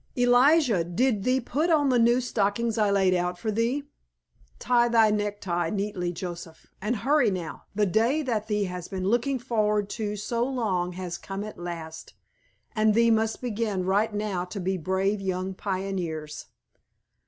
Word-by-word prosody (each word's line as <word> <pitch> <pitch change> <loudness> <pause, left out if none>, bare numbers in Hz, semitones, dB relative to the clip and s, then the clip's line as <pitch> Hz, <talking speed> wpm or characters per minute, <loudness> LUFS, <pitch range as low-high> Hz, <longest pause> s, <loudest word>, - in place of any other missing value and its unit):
Elijah, 245 - +4
did 200 +5 0
thee 255 +1 +3
put 290 +7 -1
on 295 -4 +3
the 250 -2 +3
new 235 +2 +4
stockings 230 -1 0
I 215 -3 +2
laid 195 -2 +3
out 180 0 -1
for 215 +5 -2
thee? 235 +6 0 0.7
Tie 240 -1 +3
thy 225 -2 +5
necktie 205 -5 -1
neatly, 195 -3 -2
Joseph. 175 -1 -8 0.2
And 215 +5 0
hurry, 270 +1 +2
now, 180 -4 -5
the 210 0 +3
day 230 - +2
that 225 -5 -2
thee 210 -1 0
has 180 -2 -5
been 185 -2 -4
looking 245 +5 +1
forward 210 -4 0
to 210 -2 -3
so 230 +3 -2
long 205 -9 -1
has 180 -1 -5
come 195 +1 -5
at 215 -3 -8
last, 165 -2 -7 0.6
and 215 -1 +3
thee 230 0 +4
must 220 0 +1
begin 215 -5 -1
right 205 +4 +2
now 205 -3 -2
to 190 +3 -7
be 190 +1 -1
brave 190 +4 -1
young 185 0 -2
pioneers." 185 -6 -4
210 Hz, 165 wpm, -26 LUFS, 185-235 Hz, 0.7 s, thy